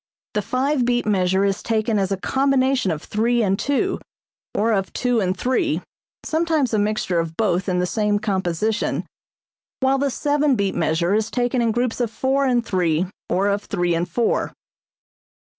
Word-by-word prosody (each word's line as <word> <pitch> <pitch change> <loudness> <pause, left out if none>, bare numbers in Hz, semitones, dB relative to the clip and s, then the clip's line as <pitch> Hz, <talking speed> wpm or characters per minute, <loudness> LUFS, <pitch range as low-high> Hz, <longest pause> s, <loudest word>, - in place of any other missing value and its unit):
The 210 - 0
five 260 +4 0
beat 245 0 +1
measure 190 -1 +2
is 195 -1 0
taken 220 -1 0
as 195 0 -1
a 195 - 0
combination 265 0 +1
of 155 -3 -3
three 235 +2 +1
and 195 -1 +1
two, 285 +7 0 0.6
or 225 +2 +2
of 195 -3 0
two 245 -2 +1
and 185 -2 0
three 280 - 0 0.4
(sometimes 315 -6 +1
a 215 - +3
mixture 205 -4 0
of 165 -1 -4
both 190 -3 +1
in 180 - +1
the 180 - +1
same 210 +2 +1
composition), 205 +1 -1 0.7
while 270 +1 +2
the 280 0 +1
seven 290 +1 +1
beat 200 -3 0
measure 170 +2 +1
is 215 +1 +1
taken 245 0 0
in 230 -1 +2
groups 245 +1 -1
of 235 - 0
four 270 +4 0
and 240 -2 +1
three, 175 -4 +1 0.2
or 195 +2 +1
of 200 +1 -1
three 175 -1 0
and 170 +2 -1
four. 230 +6 0
215 Hz, 175 wpm, -22 LUFS, 190-255 Hz, 0.7 s, a